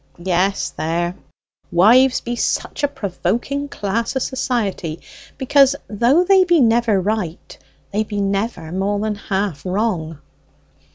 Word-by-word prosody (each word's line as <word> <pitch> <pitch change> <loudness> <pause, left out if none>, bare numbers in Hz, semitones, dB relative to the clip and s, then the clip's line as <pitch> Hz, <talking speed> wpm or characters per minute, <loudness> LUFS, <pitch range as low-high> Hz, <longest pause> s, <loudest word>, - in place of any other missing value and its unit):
"Yes: 185 +2 0
there; 170 +2 -2 0.6
wives 245 +9 +5
be 240 0 -4
such - - -2
a 285 - +3
provoking 270 +3 -3
class 225 +4 -2
o' - - +1
society, 210 - -2 0.4
because 275 +1 +4
though 240 - +3
they 380 0 +5
be 345 -2 +3
never 230 -4 +3
right, 190 -4 -3 0.4
they 210 +2 0
be 210 -1 -5
never 195 -4 -2
more 195 +3 -1
than 215 0 -1
half 195 -6 -3
wrong." 180 -5 -2
210 Hz, 125 wpm, -19 LUFS, 185-245 Hz, 0.6 s, wives